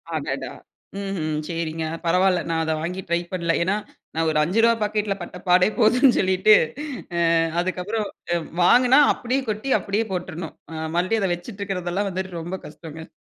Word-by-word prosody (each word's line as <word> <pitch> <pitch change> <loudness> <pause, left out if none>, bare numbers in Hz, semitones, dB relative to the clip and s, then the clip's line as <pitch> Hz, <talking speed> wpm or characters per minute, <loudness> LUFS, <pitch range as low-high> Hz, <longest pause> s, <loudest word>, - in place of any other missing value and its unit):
அடாடா। - - -3 0.5
ம்ஹ்ம். 170 -6 -2
சரிங்க. 165 -1 -3 0.2
பரவால்ல! 180 +1 +3
நான் 165 -1 0
அதை 160 - 0
வாங்கி 180 +3 -3
ட்ரை 170 0 +2
பண்ணல. 170 -2 0
ஏன்னா 190 +3 +1 0.4
நான் 165 0 +1
ஒரு 155 - 0
₹5 225 +8 +3
பாக்கெட்டில 210 -1 0
பட்டப்பாடே 180 +1 +2
போதும்னு 245 +3 +5
சொல்லிட்டு 190 +3 +4 0.6
அ. - - +1 0.4
அதுக்கப்புறம் 185 +4 -2 0.6
வாங்கினா 250 +7 +6
அப்படியே 255 +3 -1
கொட்டி, 215 +6 -3
அப்படியே 205 +2 -1
போட்றனும். 175 -3 -5 0.2
அ - - -7 0.2
மறுபடியும் 190 +5 +1
அத 185 - +1
வச்சுக்கிட்டுருக்கிறதெல்லாம் 195 0 -3
வந்து 185 +1 -2 0.2
ரொம்ப 175 +3 -5
கஷ்டங்க. 160 +1 -10
185 Hz, 140 wpm, -23 LUFS, 170-210 Hz, 0.6 s, வாங்கினா